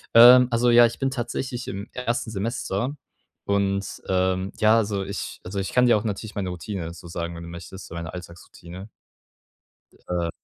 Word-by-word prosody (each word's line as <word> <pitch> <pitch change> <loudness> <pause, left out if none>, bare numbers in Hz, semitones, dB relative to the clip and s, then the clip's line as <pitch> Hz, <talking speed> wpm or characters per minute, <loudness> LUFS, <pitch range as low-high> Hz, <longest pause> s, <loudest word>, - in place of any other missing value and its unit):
Ähm, 125 +1 +10
also, 120 +1 +3
ja, 120 0 +8
ich 115 - -2
bin 135 -1 0
tatsächlich 125 0 -4
im 100 +2 -5
1. 120 -2 -2
Semester 115 +4 -2 0.5
und, 100 -1 +1 0.2
ähm, 95 +1 0
ja, 110 +1 +5
also 100 -3 0
ich 100 0 -6
also 95 +2 -4
ich 95 - -3
kann 125 0 +4
dir 120 -3 +5
auch 105 - -3
natürlich 105 0 -4
meine 95 -3 -2
Routine 90 -1 -5
so 85 0 -12
sagen, 85 0 -4
wenn 85 - -8
du 85 - -8
möchtest, 85 +2 -10
meine 85 +1 -6
Alltagsroutine. 90 +2 -10 1.2
Äh 85 -1 -1
100 Hz, 175 wpm, -24 LUFS, 90-115 Hz, 1.2 s, Ähm